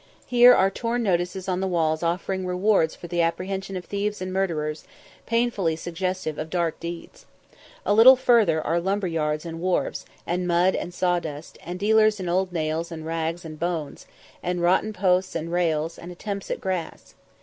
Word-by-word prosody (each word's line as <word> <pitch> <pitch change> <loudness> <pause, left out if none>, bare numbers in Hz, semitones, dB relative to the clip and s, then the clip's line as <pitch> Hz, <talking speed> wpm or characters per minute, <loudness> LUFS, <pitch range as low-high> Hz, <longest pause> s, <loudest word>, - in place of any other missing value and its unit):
Here 245 0 +7
are 190 +1 +3
torn 235 +3 -2
notices 180 -1 -1
on 185 -1 0
the 190 - -1
walls 160 -3 0
offering 185 +2 -2
rewards 180 -2 +2
for - - -11
the 175 0 0
apprehension 190 +3 -2
of 180 - -7
thieves 205 +1 -2
and 185 0 -4
murderers, 160 -5 -1 0.4
painfully 230 -8 +1
suggestive 175 -1 -3
of 155 +1 -4
dark 170 -2 -1
deeds. 170 0 -8 0.6
A - - +3
little 235 +5 +9
further 230 -10 +3
are 170 +1 +1
lumber 195 +3 -1
yards 155 -2 -1
and 165 -1 -6
wharfs, 185 0 -1 0.2
and 180 +1 -1
mud 175 +2 +3
and 175 - -4
sawdust, 175 -4 -2
and 175 +1 -5
dealers 215 +1 +3
in 185 - -4
old 185 +1 0
nails 160 0 -2
and 160 -1 -7
rags 165 +1 -3
and 155 -1 -8
bones, 165 -4 -3 0.3
and 180 -1 -2
rotten 185 +5 +3
posts 185 -2 +1
and 165 0 -3
rails, 165 -2 0
and 175 - -9
attempts 200 +2 -6
at - - -2
grass. 185 -4 -4
180 Hz, 175 wpm, -24 LUFS, 165-195 Hz, 0.6 s, little